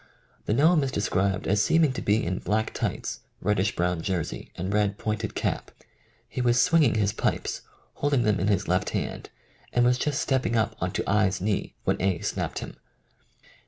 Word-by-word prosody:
The 105 Hz, -, +2 dB
gnome 155 Hz, +4 st, +5 dB
is 135 Hz, -, -1 dB
described 95 Hz, -2 st, 0 dB
as 105 Hz, +1 st, +2 dB
seeming 160 Hz, -1 st, +3 dB
to -, -, -4 dB
be 105 Hz, +2 st, +2 dB
in 90 Hz, +2 st, -1 dB
black 110 Hz, +1 st, -1 dB
tights, -, -, -3 dB, 0.2 s
reddish 105 Hz, -1 st, +1 dB
brown 90 Hz, -1 st, 0 dB
jersey, 90 Hz, -2 st, -3 dB
and 95 Hz, +3 st, -3 dB
red 105 Hz, -1 st, +1 dB
pointed 110 Hz, 0 st, -3 dB
cap. -, -, -2 dB, 0.6 s
He -, -, -4 dB
was 120 Hz, 0 st, +3 dB
swinging 165 Hz, -9 st, +4 dB
his 105 Hz, -1 st, +1 dB
pipes, -, -, -1 dB, 0.3 s
holding 140 Hz, -4 st, +1 dB
them 105 Hz, -3 st, +2 dB
in 95 Hz, -, 0 dB
his 100 Hz, -1 st, +1 dB
left 90 Hz, +1 st, +1 dB
hand -, -, -5 dB, 0.4 s
and 120 Hz, 0 st, +3 dB
was 125 Hz, +1 st, +3 dB
just 145 Hz, 0 st, 0 dB
stepping 130 Hz, -3 st, 0 dB
up 110 Hz, 0 st, +1 dB
on 90 Hz, -, 0 dB
to -, -, -2 dB
I. 105 Hz, 0 st, +3 dB
's 95 Hz, -, -4 dB
knee 100 Hz, +2 st, -2 dB
when -, -, 0 dB
A. 95 Hz, -2 st, +1 dB
snapped -, -, -2 dB
him. -, -, -12 dB
105 Hz, 190 wpm, -26 LUFS, 95-125 Hz, 0.6 s, gnome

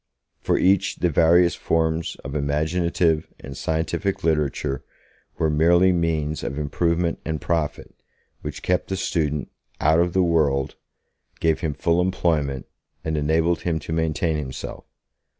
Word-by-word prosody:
For -, -, +1 dB
each 95 Hz, 0 st, +3 dB
the 90 Hz, -, 0 dB
various 85 Hz, +3 st, +5 dB
forms 80 Hz, 0 st, 0 dB
of 70 Hz, -, -6 dB
imaginative 80 Hz, +2 st, +1 dB
and 70 Hz, -, -9 dB
scientific 80 Hz, +6 st, -2 dB
literature 75 Hz, -3 st, 0 dB, 0.5 s
were 80 Hz, -, +2 dB
merely 85 Hz, +4 st, +4 dB
means 80 Hz, -3 st, 0 dB
of 70 Hz, -, -4 dB
improvement 85 Hz, +3 st, 0 dB
and 80 Hz, -1 st, -3 dB
profit, 80 Hz, -3 st, -2 dB, 0.5 s
which -, -, -6 dB
kept 90 Hz, 0 st, 0 dB
the 95 Hz, -, -2 dB
student 75 Hz, -6 st, -1 dB, 0.3 s
'out 80 Hz, +2 st, +4 dB
of 85 Hz, 0 st, +2 dB
the 95 Hz, -1 st, +3 dB
world', 75 Hz, -6 st, +1 dB, 0.7 s
gave 80 Hz, -1 st, +2 dB
him 75 Hz, -3 st, -2 dB
full 85 Hz, +1 st, +2 dB
employment, 80 Hz, -7 st, 0 dB, 0.4 s
and 80 Hz, 0 st, -2 dB
enabled 80 Hz, +3 st, +1 dB
him 85 Hz, -2 st, 0 dB
to 80 Hz, +1 st, -5 dB
maintain 80 Hz, 0 st, 0 dB
himself. 65 Hz, -3 st, -6 dB
80 Hz, 135 wpm, -23 LUFS, 75-85 Hz, 0.7 s, various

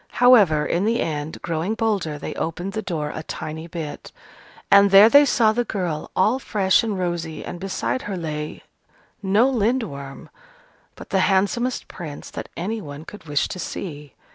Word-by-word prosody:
However, 205 Hz, -12 st, +5 dB
in 180 Hz, +4 st, 0 dB
the 230 Hz, +2 st, +1 dB
end, 150 Hz, -1 st, -3 dB
growing 170 Hz, +6 st, -2 dB
bolder, 205 Hz, -10 st, -1 dB
they -, -, -6 dB
opened 175 Hz, +4 st, -4 dB
the 220 Hz, -, -2 dB
door 155 Hz, -7 st, -3 dB
a 155 Hz, -, -5 dB
tiny 160 Hz, +1 st, -6 dB
bit. 165 Hz, -4 st, -7 dB, 0.6 s
And 200 Hz, 0 st, +7 dB
there 200 Hz, +3 st, +8 dB
they 285 Hz, +3 st, +7 dB
saw 230 Hz, -5 st, +3 dB
the 240 Hz, +2 st, 0 dB
girl, 180 Hz, -9 st, -3 dB
all 215 Hz, +7 st, +3 dB
fresh 195 Hz, -7 st, +2 dB
and 215 Hz, -4 st, -2 dB
rosy, 170 Hz, -3 st, -3 dB
and 175 Hz, -, -6 dB
beside 195 Hz, +7 st, -2 dB
her 195 Hz, -, -3 dB
lay 150 Hz, -3 st, -5 dB, 0.6 s
no 205 Hz, +5 st, +3 dB
Lindworm, 215 Hz, -, -2 dB, 0.6 s
but -, -, -12 dB
the 195 Hz, -, +2 dB
handsomest 205 Hz, +6 st, 0 dB
prince 155 Hz, -5 st, -8 dB
that -, -, -7 dB
any 215 Hz, +6 st, -3 dB
one 145 Hz, -1 st, -9 dB
could 210 Hz, -2 st, -11 dB
wish 145 Hz, -2 st, 0 dB
to 185 Hz, -, -6 dB
see. 150 Hz, -6 st, -6 dB
185 Hz, 165 wpm, -22 LUFS, 155-215 Hz, 0.6 s, there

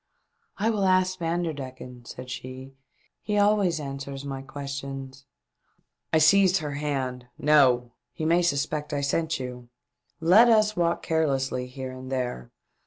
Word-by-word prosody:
" 465 Hz, 0 st, -46 dB
I 220 Hz, +3 st, +1 dB
will 205 Hz, -3 st, 0 dB
ask 185 Hz, 0 st, +2 dB
Vanderdecken," 140 Hz, -8 st, -4 dB
said 125 Hz, +1 st, -8 dB
she, 130 Hz, +2 st, -8 dB, 0.3 s
" -, -, -41 dB
he 210 Hz, -1 st, -1 dB
always 205 Hz, -5 st, +3 dB
answers 140 Hz, -1 st, -6 dB
my 135 Hz, -1 st, -5 dB
questions." 135 Hz, -1 st, -7 dB, 0.9 s
I -, -, +4 dB
seized 185 Hz, +4 st, +5 dB
her 150 Hz, -4 st, -4 dB
hand. 135 Hz, -4 st, -3 dB
" -, -, -46 dB, 0.2 s
No! 125 Hz, -4 st, +4 dB, 0.2 s
He 155 Hz, -, -5 dB
may 170 Hz, +2 st, +4 dB
sus 145 Hz, -4 st, +1 dB
pect 150 Hz, -1 st, -5 dB
I 145 Hz, -, 0 dB
sent 160 Hz, +2 st, 0 dB
you. 125 Hz, -1 st, -7 dB, 0.5 s
Let 190 Hz, +9 st, +6 dB
us 215 Hz, -2 st, +4 dB
walk 170 Hz, -1 st, 0 dB
carelessly 135 Hz, -5 st, 0 dB
here 130 Hz, 0 st, -7 dB
and 130 Hz, 0 st, -9 dB
there. 125 Hz, -, -3 dB
140 Hz, 155 wpm, -26 LUFS, 130-170 Hz, 0.9 s, Let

